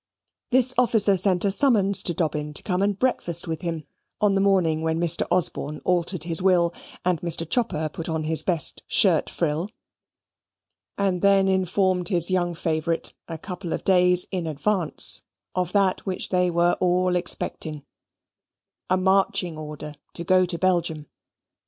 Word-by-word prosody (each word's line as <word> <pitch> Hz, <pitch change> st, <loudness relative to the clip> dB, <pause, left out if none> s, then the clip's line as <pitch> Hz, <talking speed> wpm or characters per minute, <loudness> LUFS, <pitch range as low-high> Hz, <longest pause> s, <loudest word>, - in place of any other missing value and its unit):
This 255 Hz, 0 st, +3 dB
officer 220 Hz, -5 st, +3 dB
sent 185 Hz, 0 st, +1 dB
a 200 Hz, -, +2 dB
summons 200 Hz, -4 st, +3 dB
to 175 Hz, -, -2 dB
Dobbin 150 Hz, -2 st, -2 dB
to -, -, -4 dB
come 185 Hz, -1 st, -1 dB
and 200 Hz, -1 st, +1 dB
breakfast 175 Hz, -9 st, -1 dB
with 160 Hz, -1 st, -4 dB
him, 165 Hz, -3 st, -4 dB, 0.4 s
on 205 Hz, -1 st, +3 dB
the 195 Hz, -, +2 dB
morning 180 Hz, -5 st, +2 dB
when 160 Hz, 0 st, -1 dB
Mr. 170 Hz, -1 st, -1 dB
Osborne 155 Hz, -4 st, -1 dB
altered 180 Hz, -2 st, +1 dB
his 165 Hz, 0 st, 0 dB
will 175 Hz, -2 st, +3 dB, 0.3 s
and 180 Hz, -3 st, +1 dB
Mr. 170 Hz, -1 st, -1 dB
Chopper 165 Hz, -7 st, 0 dB
put 160 Hz, +2 st, -7 dB
on 160 Hz, -1 st, -2 dB
his 160 Hz, +1 st, +1 dB
best 170 Hz, -5 st, -1 dB
shirt -, -, +3 dB
frill, 165 Hz, +4 st, -2 dB, 1.3 s
and 190 Hz, -3 st, 0 dB
then 195 Hz, -1 st, +4 dB
informed 185 Hz, -1 st, +1 dB
his 175 Hz, -2 st, +1 dB
young 175 Hz, -2 st, 0 dB
favourite, 165 Hz, 0 st, -2 dB
a 165 Hz, -, -6 dB
couple 180 Hz, 0 st, -6 dB
of -, -, -4 dB
days 180 Hz, -1 st, +3 dB
in 180 Hz, -4 st, -3 dB
advance, 165 Hz, +3 st, 0 dB, 0.3 s
of 180 Hz, -1 st, -1 dB
that 195 Hz, -2 st, +2 dB
which 190 Hz, -2 st, -3 dB
they 180 Hz, -1 st, +2 dB
were 175 Hz, 0 st, +2 dB
all 180 Hz, 0 st, +2 dB
expecting 160 Hz, -4 st, -2 dB, 1.1 s
a 185 Hz, -, +3 dB
marching 190 Hz, -2 st, +1 dB
order 150 Hz, -1 st, -7 dB, 0.2 s
to 170 Hz, -, -5 dB
go 185 Hz, +1 st, +3 dB
to 170 Hz, -1 st, -2 dB
Belgium. 170 Hz, -4 st, 0 dB
180 Hz, 160 wpm, -24 LUFS, 165-190 Hz, 1.3 s, then